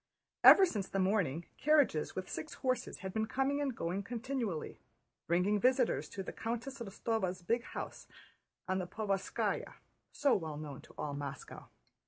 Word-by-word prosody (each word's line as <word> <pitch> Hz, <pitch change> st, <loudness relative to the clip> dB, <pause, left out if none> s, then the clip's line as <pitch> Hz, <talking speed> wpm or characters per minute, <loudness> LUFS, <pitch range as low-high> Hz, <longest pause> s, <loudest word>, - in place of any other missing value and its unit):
Ever 390 Hz, -, +10 dB
since 210 Hz, -, -3 dB
the -, -, -2 dB
morning, 185 Hz, -5 st, +1 dB
carriages 285 Hz, -, +3 dB
with 185 Hz, 0 st, -4 dB
six 155 Hz, -, -6 dB
horses 255 Hz, -1 st, -2 dB
had 190 Hz, -, -4 dB
been 220 Hz, 0 st, 0 dB
coming 270 Hz, +4 st, 0 dB
and 270 Hz, -4 st, -1 dB
going 180 Hz, +4 st, -1 dB
continually, 230 Hz, -, -3 dB, 0.5 s
bringing 180 Hz, +5 st, +2 dB
visitors 255 Hz, +1 st, +2 dB
to 195 Hz, -, -5 dB
the -, -, -6 dB
Countess 240 Hz, +4 st, -4 dB
Rostóva's 195 Hz, -4 st, -2 dB
big 230 Hz, +7 st, +1 dB
house -, -, -7 dB, 0.6 s
on 190 Hz, 0 st, +1 dB
the 180 Hz, -, -3 dB
Povarskáya, 200 Hz, -1 st, -1 dB, 0.4 s
so 280 Hz, -3 st, +3 dB
well 160 Hz, -5 st, -1 dB
known 150 Hz, -3 st, -7 dB
to -, -, -17 dB
all 145 Hz, -, -3 dB
Moscow. 140 Hz, -1 st, -7 dB
200 Hz, 155 wpm, -34 LUFS, 180-250 Hz, 0.6 s, Ever